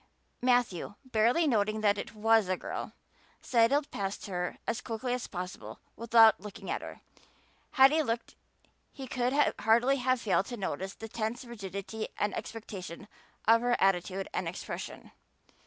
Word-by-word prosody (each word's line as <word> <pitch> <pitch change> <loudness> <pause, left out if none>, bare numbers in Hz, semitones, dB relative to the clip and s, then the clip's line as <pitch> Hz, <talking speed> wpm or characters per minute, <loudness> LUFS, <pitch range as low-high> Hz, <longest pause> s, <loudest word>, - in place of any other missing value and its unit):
Matthew, 245 -7 +1
barely 245 +6 +3
noting 215 -5 +1
that 205 -1 +3
it - - -7
was 220 -2 +3
a 185 - +1
girl, - - -5 0.5
sidled 260 +5 +2
past 195 0 -4
her 180 -3 -3
as 230 +1 -2
quickly 245 +1 -3
as 250 -2 -3
possible 180 -1 -7 0.2
without 225 -1 +6
looking 210 -2 -7
at - - -2
her. - - -9 0.7
Had 265 +1 +7
he 315 +1 +3
looked 230 -5 -3 0.6
he 270 - -8
could 255 +3 +1
hardly 235 +5 +4
have 255 0 +1
failed 195 -3 +1
to 240 - -5
notice 190 0 -4
the 225 - -8
tense 225 +3 -3
rigidity 200 -1 -6
and 205 - 0
expectation 200 -5 -7 0.4
of 230 +1 +6
her 245 0 +2
attitude 195 0 +1
and 180 - -2
expression. 170 - -6
225 Hz, 150 wpm, -30 LUFS, 195-245 Hz, 0.7 s, Had